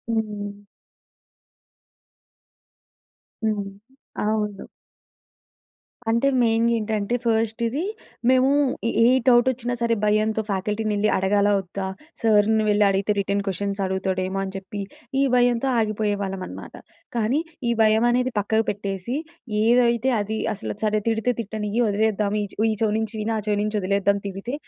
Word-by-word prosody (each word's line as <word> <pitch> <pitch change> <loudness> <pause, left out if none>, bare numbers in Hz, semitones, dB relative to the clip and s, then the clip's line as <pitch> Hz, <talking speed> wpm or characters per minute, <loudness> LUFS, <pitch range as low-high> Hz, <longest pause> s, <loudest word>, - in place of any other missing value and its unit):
హ్మ్. 205 -2 -3 2.8
హ్మ్. 210 -2 0 0.6
అవును. 210 -2 -2 1.4
అంటే 235 +4 +2
మెయిన్‌గా 230 0 +3
ఏంటంటే 215 +1 -1
ఫస్ట్ 225 0 0
ఇది 270 +7 -2 0.5
మేము 260 +1 +4 0.4
ఏ - - 0
ఏ - - +6 0.2
డౌట్ 240 0 +6
వచ్చినా 245 -1 -3
సరే 230 -1 +2
భయంతో 215 +1 +2
ఫ్యాకల్టీని 210 +3 -1
వెళ్లి 210 +1 +2
అడగాలా, 200 +2 +2
వద్దా? 190 +1 -5 0.3
సార్‌ని 220 0 +3
వెళ్లి 210 0 +4
అడిగితే 195 +2 +1
రిటర్న్ 200 +1 0
క్వశ్చన్స్ 200 +1 -2
అడుగుతాడేమో 190 0 -1
అని 190 - -4
చెప్పి 195 +2 -6 0.4
ఈ - - +4
భయంతో 245 +1 +3
ఆగిపోయేవాళ్ళం 205 -3 -1
అనమాట. - - -9 0.4
కానీ 235 +5 +1 0.3
ఈ - - +3
భయం 220 +1 +4
అనేది 250 +1 +1
పక్కకు 220 +2 +1
పెట్టేసి, 200 +3 -3 0.5
ఏదైతే 240 +2 +3
అది 215 +2 -2 0.2
అసలు 110 - -5
సరే 215 0 +1
తిడితే 225 +2 +1
తిట్టనియ్యి 215 +2 -2
వదిలేద్దాం. 210 0 +1
ఈ - - -2
చెవ 220 - 0
ఈ - - 0
చెవి 215 -2 +2
నుంచి 220 +1 -3
విని 220 +2 -1
ఆ - - -1
చెవి 210 -1 +1
నుంచి 215 +1 -2
వదిలేద్దాం 200 +1 +1
తిడితే. 195 +6 -6
215 Hz, 135 wpm, -23 LUFS, 200-225 Hz, 2.8 s, ఏ